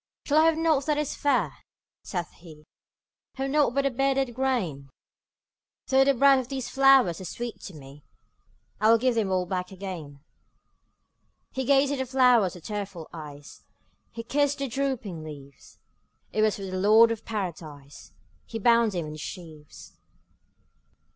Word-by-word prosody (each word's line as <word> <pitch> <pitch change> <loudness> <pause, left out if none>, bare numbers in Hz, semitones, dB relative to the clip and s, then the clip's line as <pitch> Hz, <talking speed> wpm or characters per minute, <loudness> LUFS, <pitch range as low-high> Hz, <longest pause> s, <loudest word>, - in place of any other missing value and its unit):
``Shall 295 - +1
I 315 - +6
have 325 -1 +3
nought 315 -4 +1
that 300 -1 +1
is 300 -1 -2
fair?'' 285 - 0 0.4
saith 175 -3 -5
he; 155 -3 -16 0.7
``Have 270 0 -2
nought 290 -4 +2
but 275 - +2
the 275 - +1
bearded 270 0 0
grain? 215 - -2 1.0
Though 265 0 +4
the 275 0 +2
breath 275 +1 +5
of 255 - -5
these 265 -2 -5
flowers 270 -11 +4
is 185 - -6
sweet 240 -1 -6
to 190 - -9
me, 140 0 -13 0.8
I 215 +2 +3
will 230 - +7
give 250 +2 +1
them 220 -4 0
all 185 -1 +1
back 180 0 -4
again.'' 180 -7 -8 1.3
He 265 0 -3
gazed 280 +1 +3
at 280 - -3
the 260 - -2
flowers 250 -7 +3
with 175 - -13
tearful 200 -6 -6
eyes, 145 -3 -10 0.5
He 230 0 -7
kissed 285 +3 0
their 275 -1 -3
drooping 230 - -3
leaves; 140 -3 -12 0.6
It 215 - +1
was 215 -1 +2
for 200 - -8
the 185 -1 -4
Lord 220 +4 +6
of 225 -1 -4
Paradise 160 -9 -7 0.4
He 225 - -5
bound 230 -1 +3
them 175 -3 -3
in 150 - -7
his 155 0 -8
sheaves. 155 -5 -10
225 Hz, 165 wpm, -26 LUFS, 175-270 Hz, 1.3 s, will